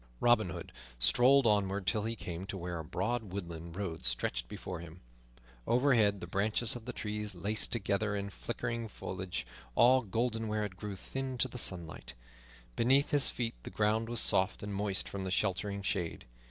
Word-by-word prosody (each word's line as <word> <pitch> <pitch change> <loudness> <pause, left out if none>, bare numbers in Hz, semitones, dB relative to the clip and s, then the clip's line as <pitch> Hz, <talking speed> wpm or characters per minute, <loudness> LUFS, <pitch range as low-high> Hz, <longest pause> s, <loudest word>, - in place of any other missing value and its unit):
Robin 120 -5 +4
Hood - - -7 0.3
strolled 125 - +5
onward 100 -2 +2
till 105 +1 +1
he 115 +1 -2
came 90 -2 -6
to 95 - -4
where 90 -1 -4
a - - -4
broad 110 +6 -2
woodland 85 -3 -6
road 90 -5 -4
stretched - - 0
before 90 +7 -6
him. 85 +1 -10 0.7
Overhead 115 -6 +3
the - - -4
branches 105 +6 0
of 120 -2 -8
the 125 - -3
trees 105 -2 -3
laced 105 +5 +1
together 105 -1 0
in 100 0 -3
flickering 115 +1 -4
foliage, 95 - -5 0.3
all 130 +2 +6
golden 115 +1 -1
where 105 0 0
it 95 -3 -7
grew 105 +1 -5
thin 130 +6 -4
to 130 - +3
the 125 0 -5
sunlight; 85 -6 -1 0.6
beneath 135 +4 +3
his 145 -2 +4
feet 115 -1 -2
the - - -7
ground 110 +2 +1
was 120 -1 +4
soft 95 +1 +3
and 105 0 -4
moist 100 -1 0
from 100 -1 -5
the 95 - -3
sheltering 100 +1 -1
shade. 90 -4 -2
105 Hz, 180 wpm, -33 LUFS, 95-115 Hz, 0.7 s, all